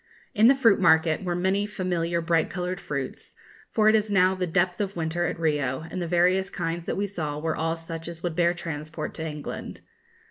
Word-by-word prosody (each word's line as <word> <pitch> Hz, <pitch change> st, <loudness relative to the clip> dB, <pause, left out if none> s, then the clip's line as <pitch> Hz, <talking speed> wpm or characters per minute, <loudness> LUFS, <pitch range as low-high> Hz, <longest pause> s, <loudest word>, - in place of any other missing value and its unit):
In 220 Hz, -1 st, +5 dB
the 270 Hz, -, +7 dB
fruit 230 Hz, -6 st, +4 dB
market 160 Hz, -1 st, +4 dB
were 175 Hz, -1 st, -1 dB
many 190 Hz, +3 st, +1 dB
familiar 175 Hz, -4 st, -1 dB
bright 165 Hz, -1 st, +1 dB
coloured 180 Hz, +1 st, -3 dB
fruits; 140 Hz, -6 st, -5 dB, 0.3 s
for 215 Hz, -1 st, +2 dB
it 215 Hz, -, +6 dB
is 215 Hz, -1 st, +2 dB
now 190 Hz, -2 st, +4 dB
the 185 Hz, -1 st, -2 dB
depth 180 Hz, +2 st, +1 dB
of 200 Hz, -1 st, -3 dB
winter 170 Hz, +1 st, -1 dB
at -, -, -4 dB
Rio, 145 Hz, -5 st, 0 dB
and 185 Hz, -, -3 dB
the 170 Hz, -, -2 dB
various 180 Hz, +3 st, +2 dB
kinds 165 Hz, +1 st, -3 dB
that -, -, -2 dB
we 200 Hz, -, 0 dB
saw 160 Hz, -7 st, -4 dB
were 160 Hz, +1 st, -2 dB
all 165 Hz, +1 st, -1 dB
such 165 Hz, 0 st, -7 dB
as 170 Hz, -1 st, -8 dB
would 175 Hz, -2 st, -2 dB
bear 175 Hz, 0 st, +2 dB
transport 155 Hz, -2 st, -5 dB
to 160 Hz, -, -5 dB
England. 150 Hz, -1 st, -6 dB
175 Hz, 210 wpm, -26 LUFS, 160-190 Hz, 0.3 s, the